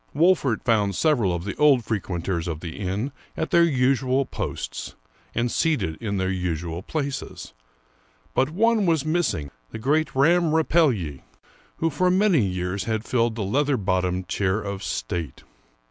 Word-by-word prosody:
Wolfert 155 -7 +3
found 105 -5 +2
several 125 - +2
of 85 -1 -2
the 100 - -4
old 140 -6 +4
frequenters 90 -5 -2
of 80 -2 -4
the 85 +1 -7
inn 100 +8 -2 0.3
at 160 - -2
their 170 - +6
usual 135 -2 +2
posts - - -5 0.4
and 120 +1 0
seated 150 - 0
in 100 -3 -2
their 95 0 0
usual 85 -2 -3
places; 140 +4 -5 0.8
but 135 +2 +2
one 215 +3 +2
was 160 -4 +2
missing, 150 - 0 0.2
the - - -7
great 150 +6 0
Ramm 160 +3 +3
Rapelye, 130 - +2 0.6
who 165 0 0
for 180 +5 +2
many 185 - +4
years 90 0 -2
had 110 0 -2
filled 115 -2 +1
the 110 - -2
leather 140 +7 +1
bottomed 90 -2 -1
chair 100 +1 0
of 100 -2 -5
state. 80 -3 -4
115 Hz, 150 wpm, -24 LUFS, 95-150 Hz, 0.8 s, their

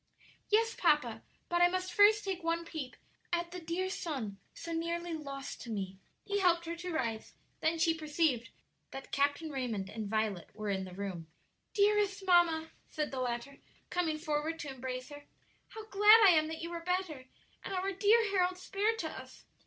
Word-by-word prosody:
"Yes, 455 +2 +3
papa; - - +2 0.3
but 345 0 +1
I 350 - +8
must 370 +1 -2
first 420 +1 +6
take 380 -2 -3
one 335 0 0
peep 310 -6 -6 0.4
at 345 0 -1
the 360 - -6
dear 340 +3 -2
son 265 - -4 0.2
so 335 - -7
nearly 335 +1 -2
lost 275 -3 -6
to 235 - -8
me." 190 -3 -4 0.3
He 405 0 0
helped 345 -3 +3
her 335 +1 -4
to 360 +1 -5
rise; 230 -8 -3 0.2
then 325 +1 +1
she 330 0 +3
perceived 300 -7 0 0.4
that 270 - -9
Captain 285 +3 +1
Raymond 230 -8 -3
and 215 -2 -5
Violet 215 -5 -1
were 215 -1 -3
in 190 -1 -2
the 180 -1 -10
room. 185 -4 -5 0.5
"Dearest 405 -1 +2
mamma," 335 -3 +4 0.2
said 300 -1 -2
the 265 - -4
latter, 245 +2 -3 0.3
coming 330 -3 0
forward 310 0 -2
to 290 - -5
embrace 255 0 -5
her, 290 0 -11 0.4
"how 440 -1 -9
glad 420 +2 +7
I 385 - +9
am 310 -2 +4
that 320 +1 -6
you 335 - -4
are 340 -1 -5
better, 355 -7 -2 0.4
and - - -6
our 380 +1 -1
dear 425 +4 +4
Harold 365 -2 +2
spared 415 +4 0
to - - -2
us!" - - -10
330 Hz, 185 wpm, -32 LUFS, 265-365 Hz, 0.5 s, I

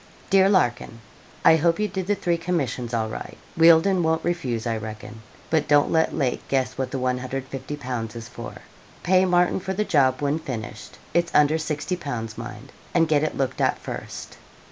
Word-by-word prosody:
'DEAR 195 0 +6
LARKIN, 120 - +1 0.5
I 160 - +8
hope 165 +3 +2
you 210 - +1
did 190 -2 -4
the 205 - +2
three 175 -3 -1
commissions 140 -9 -2
all 115 -2 0
right. 110 - -7 0.2
Wealdon 170 +3 +5
won't 160 0 0
refuse, 135 -10 -2
I 115 -1 0
reckon 110 0 -8 0.3
but 160 -2 +2
don't 145 -1 +4
let 160 0 +3
Lake 135 -5 0
guess 130 -2 0
what 130 -1 -2
the 135 - -3
150_l._ 130 -1 -4
is 115 0 -7
for. 120 -2 -8 0.5
Pay 185 +1 +4
Martin 180 0 +2
for 190 +1 -4
the 210 +2 0
job 135 -8 +3
when 145 +2 0
finished; 110 -7 -7 0.2
it 170 0 +3
is 170 - -13
under 150 +1 +5
60_l._. 150 -7 -3
mind; 115 +2 -9 0.2
and 165 -1 +4
get 150 -2 +3
it 155 - -2
looked 130 -2 -1
at - - +2
first.' - - -8
145 Hz, 180 wpm, -24 LUFS, 125-170 Hz, 0.5 s, I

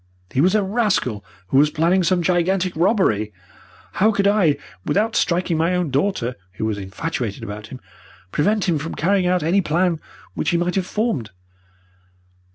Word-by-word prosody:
He 130 - +1
was 185 +6 +3
a 210 - +3
rascal 190 - 0 0.3
who 135 - +4
was 150 +1 +5
planning 170 +5 +2
some 180 0 +1
gigantic 180 +1 +1
robbery. 160 - +2 0.6
How 215 +3 +3
could 200 -1 0
I, 190 -8 +3 0.3
without 215 - 0
striking 175 -1 +1
my 165 +3 +1
own 175 -5 -1
daughter, 135 -4 0 0.2
who 100 - -3
was 105 -2 -2
infatuated 110 +2 -4
about 105 0 -7
him, 130 - -9 0.5
prevent 205 +7 +1
him 165 -4 +1
from 160 +3 -5
carrying 190 +2 +1
out 180 -2 +1
any 180 +5 +3
plan 170 0 +1 0.3
which 150 - -1
he 170 - +2
might 175 +1 0
have 190 -2 -1
formed? 210 - -1
175 Hz, 165 wpm, -21 LUFS, 140-190 Hz, 0.6 s, was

